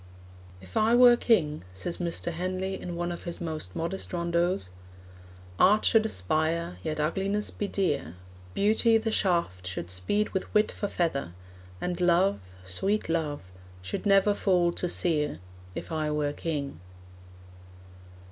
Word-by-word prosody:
'If 95 0 -14
I 225 +2 +4
were 245 0 +8
king,' 170 - +2
says 170 - -4
Mr. 175 0 -2
Henley, 185 +3 -2
in 175 -1 -5
one 175 0 -2
of 175 - -7
his 170 - -5
most 155 - -5
modest 170 +4 -3
rondeaus, 170 - 0 0.9
'Art 210 +3 +5
should 220 -1 +4
aspire, 155 - 0
yet 155 +6 -3
ugliness 195 +7 0
be 205 - -3
dear; 145 - -1 0.4
Beauty, 220 +2 +4
the 225 0 -1
shaft, 170 - 0
should 90 -1 -5
speed 95 - 0
with 190 - -3
wit 210 0 +4
for 205 - -3
feather; 150 - -1 0.5
And 180 0 -3
love, 180 +3 +3 0.2
sweet 190 - -1
love, 155 -3 -1 0.4
should 95 - -3
never 195 +1 +5
fall 180 -4 +2
to 180 +1 -3
sere, 150 -5 0 0.4
If - - -6
I 155 -1 -1
were 150 -1 0
king.' 145 - -4
170 Hz, 140 wpm, -28 LUFS, 150-195 Hz, 0.9 s, were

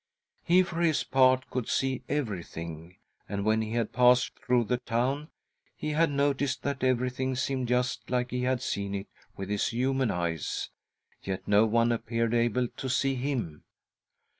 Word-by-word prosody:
He, 180 +2 +5
for 175 -2 -4
his 160 -3 +2
part, 130 -1 +3
could 125 -3 -2
see 130 -1 0
everything, 85 - -4 0.3
and, 100 0 -2
when 110 +1 +3
he 110 0 -4
had 115 -2 -1
passed 125 +1 +5
through 125 -1 +2
the 125 +3 -1
town, 130 +6 -1 0.5
he 155 - -3
had 160 +2 +3
noticed 140 -1 0
that 140 -2 -2
everything 130 +1 0
seemed 130 0 -1
just 125 +1 0
like 125 0 0
he 125 0 -1
had 130 0 0
seen 100 -3 -2
it 100 0 -4 0.3
with 95 - -5
his 105 -1 +1
human 130 +1 0
eyes— 85 -4 -2 0.5
yet 95 -1 -5
no 105 +2 +5
one 115 +2 +3
appeared 115 0 -1
able 120 +1 +2
to 130 - -4
see 135 +2 +1
him. 125 - -3
125 Hz, 165 wpm, -28 LUFS, 110-130 Hz, 0.5 s, He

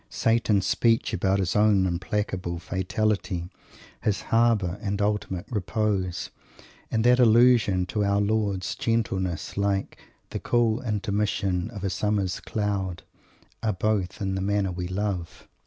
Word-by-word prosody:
Satan's 115 -4 +2
speech 115 -1 +2
about 95 +2 +1
his 95 -2 -1
own 105 -2 +4
implacable 90 -1 -2
fatality, 95 0 -1 0.5
"his 105 -2 0
harbour, 110 -5 +3
and 100 -2 -2
his 100 - +2
ultimate 100 -4 -2
repose," 100 -3 -1 0.6
and 110 -1 0
that 125 +1 +5
allusion 115 -5 +5
to 105 +3 -1
Our 100 0 +2
Lord's 100 -2 0
gentleness, 95 -7 -2
like 100 -1 -1 0.3
"the - - -3
cool 120 -1 +1
intermission 100 -3 -1
of 105 -4 -8
a 100 - -1
summer's 100 -2 0
cloud" 100 -4 -2 0.6
are 110 -2 0
both 100 0 -1
in 95 -1 -1
the 95 - -2
manner 100 -1 0
we 90 0 -4
love. 95 -2 -4
100 Hz, 135 wpm, -26 LUFS, 95-110 Hz, 0.6 s, that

